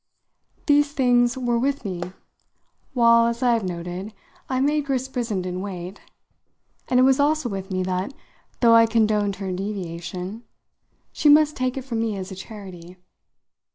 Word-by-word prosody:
These 290 Hz, -1 st, +3 dB
things 245 Hz, -2 st, +3 dB
were 240 Hz, -2 st, 0 dB
with 275 Hz, 0 st, -1 dB
me 180 Hz, -3 st, -4 dB, 0.9 s
while, 235 Hz, -1 st, +5 dB
as 235 Hz, +2 st, -2 dB
I 245 Hz, -1 st, +4 dB
have 230 Hz, -2 st, 0 dB
noted, 180 Hz, +3 st, -5 dB, 0.3 s
I 260 Hz, -1 st, 0 dB
made 295 Hz, +2 st, +1 dB
Grace 265 Hz, -2 st, -1 dB
Brissenden 190 Hz, -8 st, -3 dB
wait, 185 Hz, -1 st, -7 dB, 0.9 s
and 250 Hz, -, +3 dB
it -, -, +6 dB
was 265 Hz, +1 st, +4 dB
also 300 Hz, -1 st, +2 dB
with 195 Hz, -3 st, -5 dB
me 185 Hz, -1 st, -1 dB
that, 185 Hz, +5 st, -2 dB, 0.5 s
though 230 Hz, -2 st, +6 dB
I 230 Hz, 0 st, +7 dB
condoned 215 Hz, -3 st, +1 dB
her 195 Hz, -1 st, -5 dB
deviation, 185 Hz, +1 st, -5 dB, 0.7 s
she 300 Hz, -, +3 dB
must 300 Hz, 0 st, +5 dB
take 255 Hz, 0 st, -2 dB
it 265 Hz, -, -4 dB
from 235 Hz, -4 st, -3 dB
me 225 Hz, -3 st, -1 dB
as 190 Hz, +1 st, -6 dB
a -, -, -6 dB
charity. 185 Hz, -3 st, -10 dB
225 Hz, 155 wpm, -23 LUFS, 190-255 Hz, 0.9 s, I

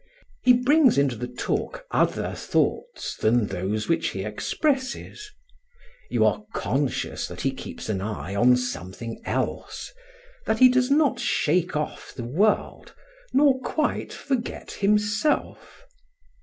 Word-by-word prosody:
He 250 Hz, -, +6 dB
brings 260 Hz, -, +4 dB
into 140 Hz, -3 st, +2 dB
the 125 Hz, +2 st, -5 dB
talk 125 Hz, -, -3 dB
other -, -, +1 dB
thoughts 485 Hz, -, -1 dB
than 115 Hz, +1 st, +2 dB
those 100 Hz, +3 st, -2 dB
which 165 Hz, -, +1 dB
he 95 Hz, -, -3 dB
expresses; 265 Hz, -, -2 dB, 0.8 s
you -, -, +2 dB
are -, -, +1 dB
conscious 135 Hz, -1 st, -1 dB
that -, -, -8 dB
he -, -, +1 dB
keeps -, -, -8 dB
an 100 Hz, -3 st, -1 dB
eye 100 Hz, -2 st, -4 dB
on 125 Hz, +5 st, +5 dB
something 115 Hz, -1 st, -5 dB
else, -, -, -3 dB, 0.5 s
that 220 Hz, -, +2 dB
he 255 Hz, +2 st, +8 dB
does 250 Hz, 0 st, +2 dB
not 290 Hz, 0 st, +3 dB
shake 175 Hz, +2 st, +1 dB
off 150 Hz, 0 st, -4 dB
the 125 Hz, -, -5 dB
world, 195 Hz, -, 0 dB, 0.4 s
nor 275 Hz, -1 st, +4 dB
quite 300 Hz, +4 st, -1 dB
forget 260 Hz, -4 st, -4 dB
himself. 210 Hz, -, 0 dB
175 Hz, 130 wpm, -25 LUFS, -, 0.8 s, he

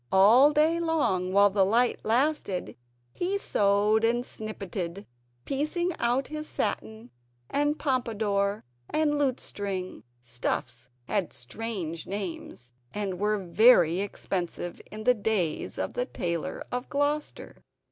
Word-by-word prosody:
All 225 Hz, +10 st, +7 dB
day 315 Hz, +3 st, +3 dB
long 290 Hz, -, 0 dB
while 200 Hz, +1 st, +5 dB
the 195 Hz, 0 st, +3 dB
light 235 Hz, +5 st, +2 dB
lasted 235 Hz, -5 st, 0 dB, 0.4 s
he 375 Hz, +3 st, -1 dB
sewed 210 Hz, -, +2 dB
and 240 Hz, +2 st, +2 dB
snippetted, 195 Hz, -4 st, -5 dB, 0.4 s
piecing 310 Hz, +6 st, -1 dB
out 245 Hz, +3 st, +1 dB
his 305 Hz, 0 st, -5 dB
satin, 220 Hz, +2 st, -3 dB, 0.4 s
and 290 Hz, +1 st, +1 dB
pompadour, 215 Hz, -7 st, 0 dB, 0.3 s
and 300 Hz, -1 st, +1 dB
lutestring; 200 Hz, -, -2 dB, 0.2 s
stuffs 120 Hz, 0 st, -3 dB, 0.2 s
had 200 Hz, -4 st, -1 dB
strange 170 Hz, -, -4 dB
names, 175 Hz, -11 st, -6 dB, 0.2 s
and 195 Hz, -3 st, -3 dB
were 210 Hz, +1 st, +1 dB
very 175 Hz, -2 st, +5 dB
expensive 180 Hz, -3 st, -4 dB
in 215 Hz, +1 st, -7 dB
the 250 Hz, -, +5 dB
days 205 Hz, -8 st, -1 dB
of -, -, -3 dB
the -, -, -2 dB
Tailor 170 Hz, -2 st, -3 dB
of 250 Hz, +1 st, -3 dB
Gloucester. 290 Hz, +1 st, -2 dB
215 Hz, 115 wpm, -27 LUFS, 185-270 Hz, 0.4 s, All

